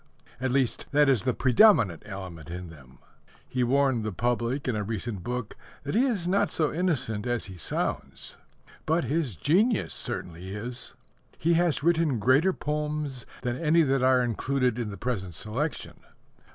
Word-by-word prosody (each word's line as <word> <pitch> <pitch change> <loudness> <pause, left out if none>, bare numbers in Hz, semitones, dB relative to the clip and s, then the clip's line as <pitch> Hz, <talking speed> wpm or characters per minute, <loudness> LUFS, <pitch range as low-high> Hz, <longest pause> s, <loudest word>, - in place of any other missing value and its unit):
At 130 +1 -1
least, 130 -2 0
that 145 0 +5
is 130 -6 +3
the 125 -1 0
predominant 125 - +5
element 95 -6 -8
in 90 0 -6
them. 65 -5 -16 0.5
He 125 -1 0
warned 130 -2 +2
the 110 - -2
public 120 +6 -1
in 125 - 0
a 105 - -1
recent 110 -1 -4
book 125 0 -4 0.3
that 145 - -3
he 240 +6 +4
is 200 -9 -1
not 195 +2 +2
so 155 -3 0
innocent 130 - -1
as 120 -1 -1
he 95 - -9
sounds. 85 - -4 0.5
But 160 +2 +2
his 145 - -1
genius 200 - +2
certainly 90 +3 -4
is. 120 +4 -6 0.4
He 170 +2 +2
has 165 -4 +2
written 165 -5 +2
greater 130 - +4
poems 150 -5 -3 0.2
than 120 -1 -1
any 165 +2 +4
that 135 -2 +1
are 130 -1 +4
included 125 +1 0
in 115 -3 -2
the 100 - -7
present 95 -9 -3
selection. 120 - -3
125 Hz, 165 wpm, -27 LUFS, 110-150 Hz, 0.5 s, that